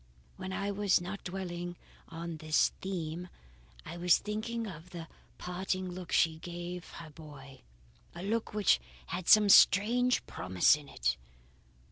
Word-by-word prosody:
"When 185 0 -6
I 200 +1 -2
was 200 -1 +2
not 190 +3 -7
dwelling 175 -1 -5 0.3
on 165 0 -6
this 155 0 +2
theme, 175 -2 -4 0.6
I 165 +2 -7
was 175 0 +4
thinking 225 +2 -4
of 180 -3 -9
the 170 -2 -8 0.3
parting 185 +1 -3
look 180 -1 -8
she 160 -2 +3
gave 175 +1 -7
her 160 -2 -10
boy; 145 -3 -13 0.5
a 175 - -7
look 225 +3 -1
which 210 -1 +3 0.3
had 180 -1 -5
some 215 -1 +7
strange 235 +6 +5
promise 95 +5 +3
in 150 -2 -11
it. 60 +1 -1
180 Hz, 140 wpm, -31 LUFS, 165-195 Hz, 0.6 s, some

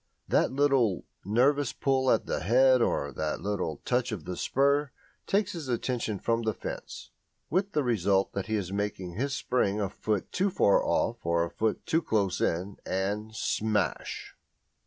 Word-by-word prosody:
That - - +2
little, 135 -8 +2 0.2
nervous 130 +6 +2
pull 130 -1 +1
at - - +2
his - - -1
head 130 +7 +5
or - - 0
that 80 0 -2
little 95 -7 -3
touch 125 -1 +1
of 95 -8 -5
the 90 - -4
spur, 140 +5 +2 0.4
takes 200 -1 +1
his 165 -5 -6
attention 120 -3 -1
from 115 +3 0
the 110 -3 -1
fence, - - -7 0.4
with 195 +4 0
the 150 - +2
result 100 -5 +1
that 100 - -3
he 110 -1 0
makes 100 +1 -1
his 105 +10 -3
spring 105 -5 0
a 100 -2 0
foot 105 -3 -2
too 195 +2 +1
far 100 - +3
off - - 0
or 85 0 +2
a 85 - -8
foot 110 -1 -1
too 165 - +2
close 100 - 0
in, 95 +4 -1
and 105 +3 -2
smash! 110 -1 -1
110 Hz, 165 wpm, -28 LUFS, 100-135 Hz, 0.4 s, head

